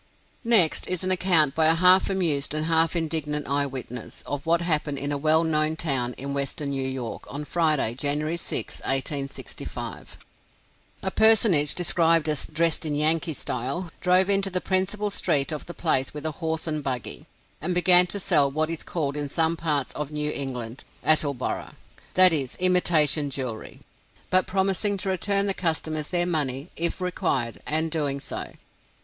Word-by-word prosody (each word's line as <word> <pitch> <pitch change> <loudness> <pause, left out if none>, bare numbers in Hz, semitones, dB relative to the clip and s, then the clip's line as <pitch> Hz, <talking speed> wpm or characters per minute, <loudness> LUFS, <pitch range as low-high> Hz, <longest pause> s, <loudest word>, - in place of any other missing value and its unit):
Next, 220 -9 +5
is 185 0 -3
an 185 - -1
account 175 -6 +4
by 160 -1 +2
a 160 - +4
half 185 +3 +4
amused 160 -7 0
and 155 0 -2
half 165 +1 +1
indignant 155 -3 -2
eye 140 +1 0
witness, 125 -3 -8
of 145 +2 -6
what 170 +1 +2
happened 155 -4 0
in 140 +1 -3
a 145 - -1
well 155 +2 +3
known 155 -1 +1
town 135 -7 -1
in 140 +2 -5
Western 140 +1 -3
New 135 -1 -2
York, 130 -3 -6
on 145 +3 -6
Friday, 155 -8 0
January 150 +5 -1
6, - - -3
1865. 135 +1 -4 0.9
A 190 - -1
personage 210 -10 +4
described 165 -2 +2
as 150 -2 -1
"dressed 165 +2 0
in 150 -2 -1
Yankee 160 +2 +1
style," 135 +9 -3
drove 185 +1 +3
into 195 -1 +2
the 185 -1 0
principal 200 +3 -1
street 145 -6 +1
of 150 - -6
the 175 - -7
place 140 -5 0
with 150 0 -7
a 155 - 0
horse 160 -1 -2
and 155 -2 -3
buggy, 130 -3 -5 0.3
and 175 +4 -2
began 180 0 +6
to 200 - -4
sell 145 -6 +2
what 155 +3 -2
is 165 - -4
called 145 -5 -3
in 145 -1 -4
some 165 +2 0
parts 150 -5 -2
of 150 -1 -5
New 150 0 -2
England 125 -4 -5 0.2
"Attleboro," 145 -4 +1 0.4
that 185 -1 +8
is, 135 -5 -1
imitation 165 -5 +3
jewelry, 130 -5 -6 0.5
but 185 0 +3
promising 195 +2 0
to 195 - -4
return 200 +2 +1
the 195 - 0
customers 160 -4 -2
their 175 -1 +2
money, 145 -3 -2
if 170 +2 -1
required, 165 -10 -2
and 160 +1 +1
doing 145 -3 -2
so. - - -6
155 Hz, 170 wpm, -24 LUFS, 140-175 Hz, 0.9 s, that